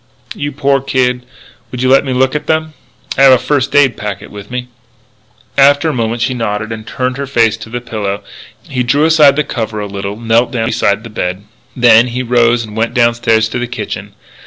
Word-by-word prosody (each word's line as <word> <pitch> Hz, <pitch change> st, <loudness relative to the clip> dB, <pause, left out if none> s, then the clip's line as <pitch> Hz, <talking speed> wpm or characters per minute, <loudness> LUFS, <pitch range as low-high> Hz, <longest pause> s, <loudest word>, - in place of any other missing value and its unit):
"You 145 Hz, 0 st, -4 dB
poor 140 Hz, -1 st, +1 dB
kid!... 125 Hz, -2 st, -1 dB, 0.4 s
Would 125 Hz, 0 st, -4 dB
you 130 Hz, -, +2 dB
let 135 Hz, +2 st, +5 dB
me 135 Hz, -, -3 dB
look 130 Hz, +1 st, +1 dB
at 150 Hz, -, -4 dB
them? 155 Hz, 0 st, 0 dB, 0.5 s
I -, -, +4 dB
have 135 Hz, -1 st, +8 dB
a -, -, +6 dB
first 140 Hz, +1 st, -1 dB
aid 135 Hz, -5 st, +4 dB
packet 105 Hz, -2 st, -6 dB
with 100 Hz, -1 st, -10 dB
me." 125 Hz, 0 st, -4 dB, 0.9 s
After 140 Hz, +3 st, +5 dB
a -, -, -2 dB
moment 115 Hz, -1 st, -1 dB
she 130 Hz, -, 0 dB
nodded 110 Hz, -2 st, -3 dB
and 110 Hz, -1 st, -7 dB
turned 125 Hz, 0 st, -2 dB
her 140 Hz, 0 st, -4 dB
face 115 Hz, -4 st, +1 dB
on -, -, -14 dB
the 120 Hz, +1 st, -4 dB
pillow. 105 Hz, -4 st, -4 dB, 0.4 s
He 125 Hz, -2 st, -3 dB
drew 140 Hz, +5 st, +2 dB
aside 155 Hz, -4 st, +5 dB
the 150 Hz, -, +1 dB
cover 110 Hz, -6 st, -4 dB
a 105 Hz, -, -3 dB
little, 100 Hz, +1 st, -6 dB
knelt 115 Hz, +1 st, +2 dB
down 115 Hz, -3 st, -1 dB
beside 110 Hz, -2 st, 0 dB
the 115 Hz, -, -10 dB
bed. 95 Hz, -1 st, -3 dB, 0.3 s
Then 120 Hz, -1 st, +5 dB
he 125 Hz, +1 st, -3 dB
rose 120 Hz, -1 st, +2 dB
and 105 Hz, -1 st, -11 dB
went 115 Hz, +2 st, -1 dB
downstairs 115 Hz, -2 st, +2 dB
to 125 Hz, -, -3 dB
the 120 Hz, -, -3 dB
kitchen. 120 Hz, -, -6 dB
120 Hz, 210 wpm, -14 LUFS, 110-135 Hz, 0.9 s, have